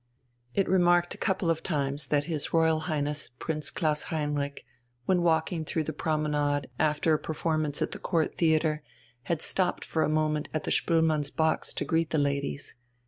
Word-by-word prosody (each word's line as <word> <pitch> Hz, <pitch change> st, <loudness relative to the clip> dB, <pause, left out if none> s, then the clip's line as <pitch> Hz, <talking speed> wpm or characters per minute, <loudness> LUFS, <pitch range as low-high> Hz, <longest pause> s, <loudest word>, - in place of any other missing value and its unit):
It 195 Hz, -, +2 dB
remarked 175 Hz, -1 st, +3 dB
a -, -, -9 dB
couple 190 Hz, -3 st, +1 dB
of 160 Hz, -, -1 dB
times 140 Hz, -3 st, -1 dB
that 145 Hz, 0 st, +2 dB
his 155 Hz, -2 st, -3 dB
Royal 160 Hz, -1 st, +3 dB
Highness 150 Hz, -1 st, -1 dB
Prince 155 Hz, 0 st, -2 dB
Klaus 155 Hz, -3 st, 0 dB
Heinrich, 145 Hz, -2 st, -2 dB, 0.4 s
when 185 Hz, -2 st, +3 dB
walking 165 Hz, 0 st, +1 dB
through 155 Hz, +1 st, -1 dB
the 155 Hz, -, -4 dB
promenade 150 Hz, -3 st, 0 dB
after 155 Hz, +1 st, +2 dB
a 155 Hz, -, +2 dB
performance 155 Hz, -2 st, -1 dB
at -, -, -3 dB
the -, -, -6 dB
Court 165 Hz, -4 st, 0 dB
Theatre, 155 Hz, -2 st, +2 dB, 0.4 s
had 165 Hz, -2 st, -1 dB
stopped 185 Hz, -2 st, +1 dB
for 160 Hz, -, -1 dB
a -, -, +2 dB
moment 155 Hz, -1 st, 0 dB
at 155 Hz, -, -1 dB
the -, -, -2 dB
Spoelmanns' 160 Hz, -3 st, +2 dB
box 160 Hz, +1 st, 0 dB
to -, -, -1 dB
greet 165 Hz, -1 st, +1 dB
the 160 Hz, -, 0 dB
ladies. 140 Hz, 0 st, -1 dB
155 Hz, 175 wpm, -28 LUFS, 150-165 Hz, 0.4 s, remarked